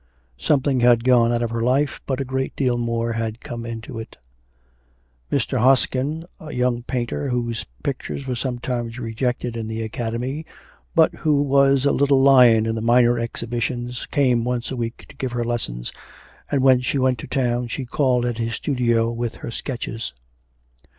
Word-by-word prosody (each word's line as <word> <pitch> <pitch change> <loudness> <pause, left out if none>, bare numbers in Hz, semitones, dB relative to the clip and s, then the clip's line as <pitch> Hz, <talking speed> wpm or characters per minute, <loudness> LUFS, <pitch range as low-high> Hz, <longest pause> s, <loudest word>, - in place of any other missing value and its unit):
Something 140 - +2
had 120 -1 +5
gone 120 -2 +4
out 120 0 +1
of 115 - -2
her 115 0 -2
life, 130 +4 +1
but 130 -1 -1
a 135 - -1
great 130 +1 -2
deal 125 -3 +1
more 115 -1 -1
had 115 0 -3
come 115 -1 -6
into 115 +1 -6
it. 110 - -9 1.1
Mr. - - 0
Hoskin, 135 +5 +2
a 155 -1 -8
young 125 -1 0
painter, 125 +3 -3
whose 120 -2 -2 0.2
pictures 140 -1 -4
were 130 - -2
sometimes 120 -1 -3
rejected 120 0 -2
in 115 -1 -4
the 110 0 -3
Academy, 120 +5 -3 0.5
but 160 -2 +5
who 145 -2 +1
was 140 -1 +4
a 140 - +4
little 140 -1 +3
lion 125 -5 +6
in 115 - 0
the 110 - -3
minor 120 +1 +4
exhibitions, 120 +1 -3
came 125 -5 +2
once 125 0 -2
a - - -2
week 115 -1 -4
to - - -15
give 130 -2 -4
her 120 -1 -1
lessons, - - -3 0.6
and 140 -2 +1
when 130 -2 +6
she 130 - -1
went 130 -2 +2
to - - -7
town 125 -2 0
she 130 +3 -4
called 125 -1 +1
at 120 -1 -2
his 115 0 -1
studio 120 -4 +1
with 120 -1 -3
her - - -7
sketches. 115 - -5
120 Hz, 175 wpm, -22 LUFS, 115-130 Hz, 1.1 s, lion